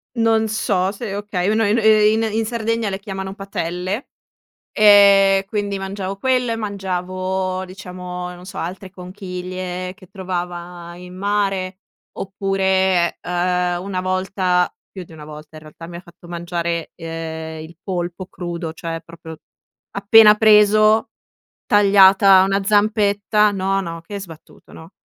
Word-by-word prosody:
Non 225 Hz, -1 st, +2 dB
so 195 Hz, -3 st, 0 dB
se 210 Hz, -1 st, -6 dB
okay, 200 Hz, -3 st, -3 dB
un 220 Hz, +1 st, +1 dB
ehm, 210 Hz, +1 st, +2 dB
i 215 Hz, -1 st, +5 dB
in 225 Hz, +1 st, 0 dB
in 225 Hz, 0 st, 0 dB
Sardegna 230 Hz, -1 st, -2 dB
le 195 Hz, 0 st, -4 dB
chiamano 190 Hz, -1 st, -6 dB
"patelle" 190 Hz, +2 st, -4 dB, 0.6 s
e 200 Hz, -2 st, +6 dB
quindi 205 Hz, -2 st, -3 dB
mangiavo 195 Hz, 0 st, -5 dB
quelle, 250 Hz, 0 st, 0 dB
mangiavo, 185 Hz, -2 st, -3 dB
diciamo, 180 Hz, -1 st, -7 dB
non 180 Hz, -, -13 dB
so, 190 Hz, +1 st, -8 dB
altre 185 Hz, +2 st, -6 dB
conchiglie 185 Hz, -1 st, -6 dB
che 185 Hz, -, -17 dB
trovava 175 Hz, -2 st, -6 dB
in 180 Hz, +1 st, -11 dB
mare 195 Hz, -1 st, -1 dB, 0.4 s
oppure, 190 Hz, -2 st, 0 dB
uhm, 180 Hz, 0 st, -1 dB
una 190 Hz, -1 st, -3 dB
volta, 185 Hz, -1 st, 0 dB, 0.2 s
più 190 Hz, -, -8 dB
di 170 Hz, -, -18 dB
una 155 Hz, -2 st, -11 dB
volta 150 Hz, +1 st, -12 dB
in 155 Hz, -, -10 dB
realtà, 155 Hz, +2 st, -12 dB
mi 175 Hz, -, -10 dB
ha 170 Hz, -, -8 dB
fatto 170 Hz, -1 st, -17 dB
mangiare, 170 Hz, -1 st, -4 dB
uhm, 160 Hz, -1 st, -6 dB
il 165 Hz, +2 st, -13 dB
polpo 180 Hz, -1 st, -4 dB
crudo, 170 Hz, -3 st, -6 dB
cioè 165 Hz, 0 st, -6 dB
proprio 160 Hz, -1 st, -11 dB, 0.6 s
appena 210 Hz, +1 st, +7 dB
preso, 215 Hz, 0 st, +4 dB, 0.6 s
tagliata 195 Hz, -1 st, +6 dB
una 195 Hz, +1 st, 0 dB
zampetta 210 Hz, 0 st, +2 dB
no, 195 Hz, 0 st, -1 dB
no, 165 Hz, -2 st, -6 dB
che 200 Hz, +4 st, -7 dB
sbattuto, 165 Hz, -4 st, -14 dB
no. 160 Hz, +3 st, -13 dB
190 Hz, 135 wpm, -20 LUFS, 180-205 Hz, 0.6 s, appena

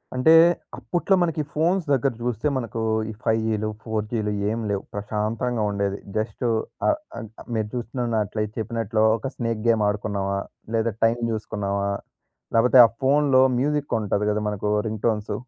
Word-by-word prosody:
అంటే 130 Hz, +6 st, +5 dB, 0.4 s
అప్పట్లో 180 Hz, +2 st, +1 dB
మనకి 165 Hz, -3 st, 0 dB
ఈ -, -, -12 dB
ఫోన్స్ 170 Hz, +3 st, +1 dB
దగ్గర 135 Hz, 0 st, +2 dB
జూస్తే 120 Hz, +2 st, -1 dB
మనకు 115 Hz, -2 st, -4 dB, 0.3 s
ఈ -, -, -8 dB
5 110 Hz, -1 st, +2 dB
జీలు 110 Hz, -1 st, -1 dB
4 110 Hz, -2 st, -2 dB
జీలు 105 Hz, -3 st, -1 dB, 0.2 s
ఏమి 115 Hz, +1 st, -2 dB
లేవు. 100 Hz, -1 st, -1 dB
ప్రశాంతంగా 110 Hz, +3 st, -2 dB
ఉండేది. 100 Hz, -1 st, -1 dB, 0.2 s
జస్ట్ 110 Hz, +3 st, -3 dB, 0.4 s
అ -, -, +5 dB, 0.3 s
ఆహ్ 115 Hz, -, -5 dB, 0.3 s
మీరు 110 Hz, -1 st, 0 dB
జూస్తున్నట్లే 115 Hz, -3 st, -2 dB
చెప్పినట్లు 115 Hz, 0 st, -1 dB, 0.2 s
ఒక 135 Hz, -, -5 dB
స్నేక్ 115 Hz, -2 st, -2 dB
గేమ్ 115 Hz, -2 st, +3 dB
ఆడుకున్నామా! 100 Hz, -1 st, -1 dB, 0.4 s
లేదా 115 Hz, -1 st, +1 dB
టైం 115 Hz, +1 st, +2 dB
జూసుకున్నామా! 100 Hz, -2 st, -2 dB, 0.7 s
లేపోతే 125 Hz, +3 st, +5 dB
ఆ -, -, -4 dB
ఫోనులో 135 Hz, -1 st, +4 dB, 0.2 s
మ్యూజిక్ 145 Hz, +2 st, 0 dB
ఉంటది 105 Hz, 0 st, 0 dB
గదా 105 Hz, -, 0 dB
మనకు 105 Hz, 0 st, -2 dB, 0.2 s
రింగ్ 110 Hz, -1 st, -4 dB
టోన్స్, 105 Hz, -2 st, 0 dB
110 Hz, 150 wpm, -24 LUFS, 105-125 Hz, 0.7 s, అంటే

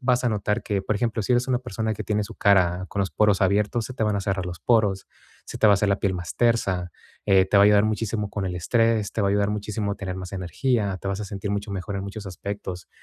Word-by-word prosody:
vas 125 Hz, -1 st, +2 dB
a -, -, +3 dB
notar 105 Hz, +1 st, -1 dB
que, 100 Hz, -3 st, -1 dB
por 105 Hz, -, -1 dB
ejemplo, 115 Hz, -1 st, -1 dB
si 125 Hz, -, 0 dB
eres 125 Hz, +2 st, +2 dB
una 125 Hz, -1 st, +2 dB
persona 110 Hz, -3 st, -3 dB
que -, -, -6 dB
tiene 105 Hz, 0 st, 0 dB
su -, -, -10 dB
cara 95 Hz, -2 st, +3 dB
con 100 Hz, -, -3 dB
los 95 Hz, -, -1 dB
poros 105 Hz, -3 st, +2 dB
abiertos, 105 Hz, +4 st, +1 dB
se 130 Hz, -, -8 dB
te 110 Hz, -, -1 dB
van 105 Hz, -1 st, +1 dB
a -, -, -1 dB
cerrar 95 Hz, -2 st, -2 dB
los 90 Hz, -1 st, -7 dB
poros, 105 Hz, -5 st, +2 dB, 0.4 s
se -, -, -8 dB
te 110 Hz, -, +4 dB
va 105 Hz, -, +7 dB
a -, -, +6 dB
hacer 100 Hz, +1 st, +1 dB
la 100 Hz, -, +3 dB
piel 95 Hz, -2 st, 0 dB
más 90 Hz, -3 st, -6 dB
tersa, 95 Hz, -7 st, +1 dB, 0.3 s
eh, 95 Hz, -2 st, +5 dB
te 100 Hz, -, +2 dB
va 100 Hz, -, +7 dB
a -, -, +7 dB
ayudar 105 Hz, 0 st, +5 dB
muchísimo 110 Hz, -1 st, -2 dB
con 100 Hz, -2 st, -3 dB
el 90 Hz, -, -3 dB
estrés, 115 Hz, +3 st, +1 dB
te 110 Hz, -, -2 dB
va -, -, +2 dB
a -, -, +2 dB
ayudar 100 Hz, 0 st, +1 dB
muchísimo 105 Hz, 0 st, -3 dB
a -, -, -3 dB
tener 95 Hz, -2 st, -5 dB
más 95 Hz, 0 st, -7 dB
energía, 100 Hz, -, -1 dB
te 100 Hz, -, -4 dB
vas 100 Hz, +1 st, -2 dB
a -, -, -3 dB
sentir 100 Hz, 0 st, -5 dB
mucho 100 Hz, 0 st, -3 dB
mejor 100 Hz, +1 st, -4 dB
en 95 Hz, -, -4 dB
muchos 100 Hz, +1 st, -7 dB
aspectos, 95 Hz, -1 st, -6 dB
100 Hz, 280 wpm, -24 LUFS, 95-110 Hz, 0.4 s, va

